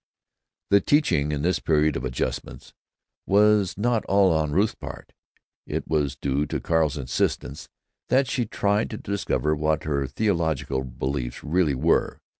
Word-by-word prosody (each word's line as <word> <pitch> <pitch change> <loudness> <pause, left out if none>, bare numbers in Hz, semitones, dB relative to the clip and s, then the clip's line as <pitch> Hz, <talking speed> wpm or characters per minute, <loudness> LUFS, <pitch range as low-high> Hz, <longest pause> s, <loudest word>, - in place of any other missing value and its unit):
The 100 0 +6
teaching, 110 - +2
in 75 -1 -2
this 90 +2 +1
Period 75 -1 +2
of - - -3
Adjustments, 60 -1 -4 0.5
was 105 -2 +3
not 115 +1 +1
all 95 -3 +4
on 80 -2 0
Ruth's 100 +8 +2
part. - - -10 0.5
It - - -3
was 75 -3 0
due 70 +2 -1
to - - -2
Carl's 80 -3 +1
insistence 65 +1 -2 0.4
that 130 +1 +3
she 120 -3 -1
tried 105 +1 0
to 110 - -6
discover 95 -7 -1
what 75 +1 0
her 70 -3 -1
theological 80 -9 -1
beliefs 65 0 -4
really 80 -2 +1
were. 80 +6 +1
80 Hz, 145 wpm, -24 LUFS, 70-100 Hz, 0.5 s, The